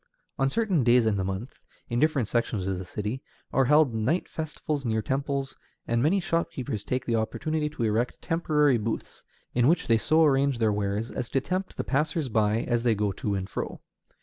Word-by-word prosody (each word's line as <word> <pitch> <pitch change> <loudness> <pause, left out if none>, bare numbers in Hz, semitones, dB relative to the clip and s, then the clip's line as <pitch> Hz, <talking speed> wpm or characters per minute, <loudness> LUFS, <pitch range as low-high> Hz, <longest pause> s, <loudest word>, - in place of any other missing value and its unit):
On 135 0 +3
certain 190 - +1
days 120 0 +5
in 110 -2 +2
the 95 - 0
month, 95 +6 -5 0.3
in 120 0 -1
different 145 -6 +2
sections 115 -5 -1
of 95 -1 -2
the 95 - -6
city, 105 +7 -4 0.3
are 135 - +4
held 150 -1 +4
night 120 +11 0
festivals 155 -2 -4
near 110 -3 0
temples, 135 +1 -2 0.3
and 115 0 +1
many 165 +9 +3
shopkeepers 165 - -2
take 130 +2 -2
the 115 - 0
opportunity 150 +7 -1
to 135 - -4
erect 115 +3 0
temporary 150 -6 +2
booths, 110 +1 -4 0.3
in 120 0 +3
which 165 +3 +3
they 115 -1 +3
so 160 +7 +4
arrange 140 -2 +3
their 110 -2 +2
wares 105 +2 -2
as 125 -2 -4
to 135 - +1
tempt 185 +7 -3
the - - -1
passers 150 0 0
by 110 0 +2
as 120 -1 0
they 115 -2 +2
go 105 -1 0
to 100 +2 -2
and 95 -1 -3
fro. - - -5
125 Hz, 200 wpm, -27 LUFS, 110-150 Hz, 0.3 s, days